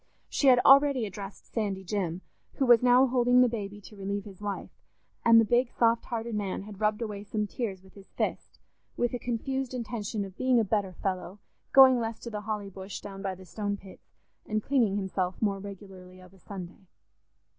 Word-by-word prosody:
She 280 - +1
had 255 -2 +8
already 275 -3 +6
addressed 200 0 -8
Sandy 200 -4 -2
Jim, 185 -3 -2 0.3
who 270 - +1
was 240 -2 +7
now 250 +1 +6
holding 250 -1 +4
the 250 - +6
baby 205 -3 -5
to 210 - -13
relieve 200 0 -4
his 200 -2 -12
wife, 205 -1 -4 0.5
and 230 -1 +7
the 225 - +4
big 240 +3 +2
soft 230 0 +2
hearted 235 -1 -4
man 200 -2 -2
had 205 0 -11
rubbed 210 +2 +1
away 205 -2 -5
some 210 +1 -2
tears 200 -3 -4
with 190 - -19
his 195 -1 -15
fist, - - -3 0.4
with 240 0 0
a 245 - -2
confused 260 +2 -3
intention 220 -3 -3
of 190 -1 -11
being 255 -2 +3
a - - +3
better 200 -2 0
fellow, 185 +1 -4 0.3
going 260 -2 +8
less 225 -1 -3
to 235 - -7
the 210 -1 -4
Holly 210 -2 -4
Bush 190 +1 -7
down 195 -1 -9
by 195 -1 -3
the 185 +1 -13
Stone 205 +1 -3
pits, 195 -1 -16 0.3
and 215 -1 -1
cleaning 240 -8 +2
himself 190 -2 -2
more 200 -3 0
regularly 190 -2 -11
of 185 0 -16
a 190 - -19
Sunday. 190 0 -9
210 Hz, 200 wpm, -28 LUFS, 195-235 Hz, 0.5 s, had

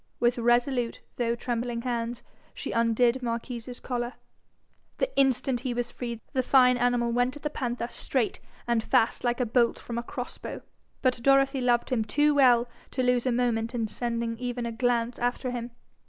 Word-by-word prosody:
With 240 0 +2
resolute, 240 +1 +1 0.2
though 235 -1 +1
trembling 235 0 -3
hands, 235 -1 -2 0.3
she - - -5
undid 235 +2 +2
Marquis's 240 +1 -4
collar. 240 -1 -3 0.8
The - - -1
instant 265 -2 +2
he 245 -1 -3
was 245 0 -2
free, 235 -2 -5
the 260 - +2
fine 250 -1 +5
animal 240 -1 +2
went 245 +3 +1
at 295 - -11
the 300 - -2
panther 240 -4 -2
straight 245 -1 -1 0.3
and 235 -2 +1
fast 225 - +2
like 240 0 0
a 250 - +2
bolt 235 +1 +2
from 235 0 -5
a - - -2
cross 245 +1 -6
bow. - - -6 0.4
But 255 -2 +2
Dorothy 275 +1 +4
loved 245 0 +2
him 235 -4 +2
too 295 +8 +2
well 250 -4 +5 0.2
to 255 - -1
lose 250 0 +2
a - - +3
moment 235 -1 0
in 225 -2 0
sending 230 0 -3
even 245 -1 -3
a 235 - -2
glance 240 0 0
after 245 +1 -1
him. 240 -1 -4
245 Hz, 180 wpm, -27 LUFS, 235-250 Hz, 0.8 s, fine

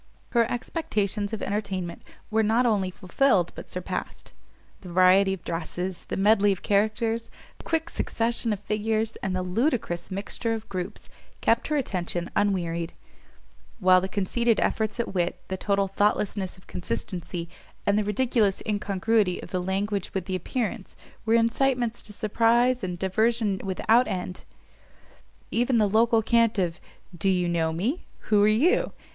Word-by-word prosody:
Her 235 -2 +3
expectations 210 - -1
of 220 - -4
entertainment 195 -4 -3 0.3
were 220 +1 +3
not 225 +3 +2
only 205 -5 +2
fulfilled 185 +1 +1
but - - -10
surpassed; 180 0 -5 0.5
the 185 - -11
variety 185 +2 +5
of 190 -3 -4
dresses, 175 +2 -4
the - - -4
medley 205 +1 +4
of 190 - -3
characters, 225 +3 +1 0.3
the - - -13
quick 325 0 0
succession 230 -6 0
of 205 - -1
figures, 220 +2 -1
and 190 -1 -3
the 185 - -1
ludicrous 200 - -1
mixture 205 +4 -3
of 220 0 -8
groups, 185 +2 -5 0.3
kept 230 - +2
her 305 - 0
attention 180 -8 -3
unwearied: 170 -5 0 0.8
while 185 -3 +5
the 190 - -3
conceited 220 +4 +1
efforts 220 0 0
at 235 - -2
wit, 175 -2 -1
the 190 - -1
total 200 +1 0
thoughtlessness 195 -1 0
of 185 - -19
consistency, 170 - -4 0.4
and 200 - +3
the 210 - +2
ridiculous 210 -1 +1
incongruity 205 -1 +1
of - - -10
the 185 - -1
language 195 +2 -2
with 190 -2 -1
the 185 - -2
appearance, 215 +2 -3 0.3
were 225 - +4
incitements 240 0 +1
to 215 - -6
surprise 235 +4 +2
and 180 -1 -3
diversion 210 +2 +1
without 220 +6 +3
end. 180 0 -4 1.1
Even 240 +1 +2
the 215 - +4
local 225 +2 +3
cant 230 0 +3
of, 175 -3 -1 0.4
_Do 190 +3 +1
you 180 -1 +1
know 165 -2 +1
me? 220 - -2 0.2
Who 210 -1 +6
are 205 - +5
you? 290 - +3
205 Hz, 150 wpm, -26 LUFS, 185-230 Hz, 1.1 s, Who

